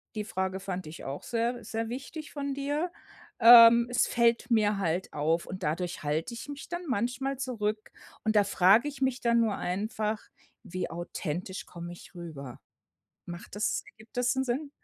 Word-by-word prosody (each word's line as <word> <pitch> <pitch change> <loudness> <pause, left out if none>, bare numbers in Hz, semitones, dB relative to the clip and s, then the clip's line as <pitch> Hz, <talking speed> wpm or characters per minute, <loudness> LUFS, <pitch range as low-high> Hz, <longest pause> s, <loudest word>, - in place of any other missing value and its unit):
Die 210 - -2
Frage 190 -1 -2
fand 185 -2 -5
ich 160 - -9
auch 135 +2 -5
sehr 235 +1 -1
sehr 225 0 -3
wichtig 280 +5 -7
von 280 -1 -3
dir. 290 +5 -2 0.5
Ähm, 235 0 +9
es 245 - +3
fällt 235 0 +2
mir 210 -2 +3
halt 175 0 -1
auf 160 +3 0
und 185 0 -7
dadurch 170 +3 -2
halte 155 +9 -1
ich 260 - -8
mich 285 -1 -8
dann 345 0 -4
manchmal 255 +4 -1
zurück. 215 -5 -3 0.3
Und 220 0 +1
da 205 - +6
frage 200 +7 +4
ich 280 -1 -7
mich 260 -1 0
dann 235 -1 +3
nur 220 -3 +1
einfach: 215 +3 -2 0.4
„Wie 185 -3 -4
authentisch 175 +2 -5
komme 175 0 -8
ich 175 - -14
rüber?“ 150 -7 -8 0.7
Macht 175 +4 -9
das 210 - 0
ergibt 220 +1 -19
das 245 0 +2
'n 265 - +2
Sinn? 280 +4 -2
220 Hz, 175 wpm, -29 LUFS, 180-245 Hz, 0.7 s, Ähm